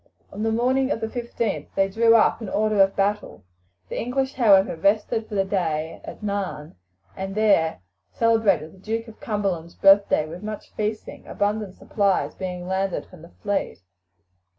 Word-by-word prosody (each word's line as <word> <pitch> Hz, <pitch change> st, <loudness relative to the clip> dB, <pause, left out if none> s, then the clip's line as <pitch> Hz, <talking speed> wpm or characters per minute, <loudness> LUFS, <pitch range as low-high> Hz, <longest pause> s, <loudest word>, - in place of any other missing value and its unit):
On 205 Hz, -, -6 dB
the 225 Hz, 0 st, +1 dB
morning 260 Hz, +4 st, +1 dB
of 230 Hz, -, -1 dB
the 225 Hz, -, -2 dB
15th 235 Hz, -2 st, -3 dB
they 195 Hz, 0 st, +3 dB
drew 225 Hz, +3 st, +4 dB
up 225 Hz, +1 st, +3 dB
in 215 Hz, -, -5 dB
order 215 Hz, 0 st, +2 dB
of 195 Hz, 0 st, +3 dB
battle. 205 Hz, +1 st, -1 dB, 0.4 s
The -, -, -4 dB
English, 265 Hz, +3 st, -1 dB
however, 200 Hz, -8 st, +4 dB
rested 215 Hz, +5 st, +1 dB
for 210 Hz, -, -5 dB
the 195 Hz, -1 st, +2 dB
day 160 Hz, -5 st, -2 dB
at -, -, -10 dB
Nairn, 200 Hz, -7 st, -3 dB, 0.4 s
and 195 Hz, +1 st, -5 dB
there 200 Hz, -, +2 dB, 0.3 s
celebrated 220 Hz, -9 st, +2 dB
the 190 Hz, -, -18 dB
Duke 225 Hz, +4 st, -3 dB
of 220 Hz, -, -13 dB
Cumberland's 195 Hz, -6 st, -3 dB
birthday 195 Hz, -5 st, +5 dB
with 170 Hz, +3 st, -8 dB
much 215 Hz, 0 st, -7 dB
feasting, 215 Hz, 0 st, -4 dB
abundant 205 Hz, -1 st, -2 dB
supplies 200 Hz, -3 st, 0 dB
being 180 Hz, -1 st, -5 dB
landed 190 Hz, 0 st, -1 dB
from 180 Hz, -4 st, -16 dB
the 170 Hz, -, -13 dB
fleet. 205 Hz, -1 st, -1 dB
205 Hz, 165 wpm, -24 LUFS, 190-220 Hz, 0.4 s, birthday